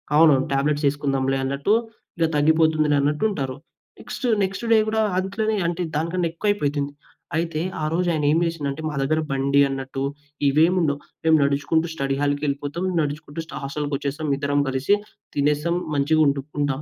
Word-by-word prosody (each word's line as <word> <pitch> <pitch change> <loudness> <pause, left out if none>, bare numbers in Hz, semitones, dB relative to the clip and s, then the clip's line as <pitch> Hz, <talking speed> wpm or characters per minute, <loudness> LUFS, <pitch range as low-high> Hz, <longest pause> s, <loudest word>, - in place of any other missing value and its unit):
అవును. 155 0 +7 0.2
టాబ్లెట్స్ 145 +2 +1
ఏసుకుందాంలే 135 -2 0
అన్నట్టు, 140 +9 0 0.4
ఇలా 165 -1 +2
తగ్గిపోతుందిలే 155 0 +3
అన్నట్టుంటారు. 145 -2 0 0.4
నెక్స్ట్, - - -6 0.2
నెక్స్ట్‌ 195 +4 -3
డే 225 - +7
గూడా, 220 0 +1 0.2
అదిట్లనే 215 +3 -1
అంటే 175 +1 -2
దానికన్నా 170 +3 0
ఎక్కువయిపోతుంది. 150 -7 -1 0.5
అయితే, 165 -2 -1 0.2
ఆరోజు 165 +4 0
ఆయనేం 150 0 +2
జేసిండంటే, 155 -3 -3
మా 150 - -5
దగ్గర 155 +4 +1
బండి 140 +1 +2
అన్నట్టు 135 0 -4 0.4
ఇవేముండవు. 155 0 +3 0.2
మేము 160 -1 +5
నడుచుకుంటూ 145 +4 +1
స్టడీ 135 -3 -1
హాల్‌కెళిపోతం. 145 +2 -1 0.2
నడుచుకుంటూ 150 +1 -4
స్ట - - -15
హస్టల్‌కొచ్చేసాం 145 +1 -3
ఇద్దరం 145 0 0
కలిసి. 135 +9 +2 0.4
తినేసం. 150 +4 +1 0.2
మంచిగుంటు 145 -1 +3 0.2
ఉంటాం. 140 -1 0
150 Hz, 130 wpm, -23 LUFS, 140-165 Hz, 0.5 s, అవును